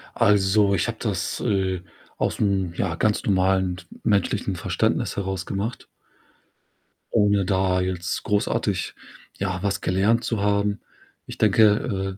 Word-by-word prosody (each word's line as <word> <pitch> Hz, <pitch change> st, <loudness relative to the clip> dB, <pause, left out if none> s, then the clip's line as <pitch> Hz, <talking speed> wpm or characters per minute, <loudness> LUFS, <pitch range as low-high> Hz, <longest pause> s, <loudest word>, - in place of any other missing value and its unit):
Also, 100 Hz, 0 st, +3 dB
ich 90 Hz, -, 0 dB
habe -, -, -4 dB
das, -, -, -2 dB
äh, 95 Hz, -3 st, 0 dB, 0.4 s
aus'm, 95 Hz, -4 st, 0 dB
ja, 85 Hz, -2 st, -1 dB
ganz 105 Hz, +4 st, +1 dB
normalen 95 Hz, -2 st, +1 dB, 0.2 s
menschlichen 100 Hz, -3 st, +1 dB
Verständnis -, -, -1 dB
heraus 95 Hz, -2 st, -3 dB
gemacht 110 Hz, +5 st, -4 dB, 1.3 s
ohne 105 Hz, -3 st, +3 dB
da 95 Hz, -1 st, +1 dB
jetzt 90 Hz, -1 st, -3 dB
großartig, 105 Hz, -1 st, -1 dB, 0.4 s
ja, 95 Hz, -1 st, -2 dB
was 100 Hz, 0 st, -1 dB
gelernt 105 Hz, +6 st, +2 dB
zu 115 Hz, -4 st, -1 dB
haben. 100 Hz, 0 st, +1 dB, 0.5 s
Ich -, -, -9 dB
denke, 105 Hz, -2 st, +2 dB
100 Hz, 120 wpm, -24 LUFS, 95-105 Hz, 1.3 s, Also